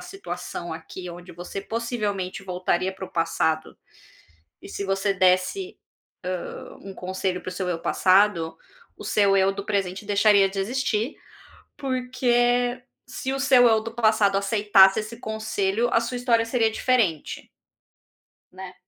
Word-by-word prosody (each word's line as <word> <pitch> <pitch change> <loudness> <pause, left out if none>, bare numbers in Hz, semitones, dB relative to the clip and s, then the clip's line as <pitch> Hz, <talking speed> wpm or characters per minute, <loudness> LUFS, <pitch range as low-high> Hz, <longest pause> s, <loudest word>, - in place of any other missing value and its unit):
situação 390 0 -7
aqui, 180 -1 -8
onde 175 +1 -11
você 175 +3 -7
possivelmente 210 -5 -3
voltaria 185 0 -1
para 190 0 -8
o - - -13
passado, 160 -1 -1 0.9
e - - -10
se 200 - -5
você 195 +1 0
desse, 185 - +1 0.8
hã, - - -10
um 195 -1 -9
conselho 185 0 -3
para - - -8
o - - -4
seu 180 0 -3
eu 165 -2 -2
passado, 185 -3 +3 0.4
o - - -10
seu 200 -2 +3
eu 195 0 +3
do 200 0 -7
presente 195 -1 -2
deixaria 205 -1 +4
de 195 0 -4
existir, 240 +2 -1 0.6
porque 245 -1 +1 0.2
se 260 +1 -5
o 270 - -2
seu 255 -3 +6
eu 220 -1 +3
do 225 0 -7
passado 215 -4 +3
aceitasse 200 -1 +4
esse 215 +2 -7
conselho, 220 0 -1
a 230 - +4
sua 240 +2 -3
história 235 -2 +2
seria 230 -1 +1
diferente. 220 - 0 1.0
Né. 185 0 -9
200 Hz, 145 wpm, -24 LUFS, 190-235 Hz, 1.0 s, seu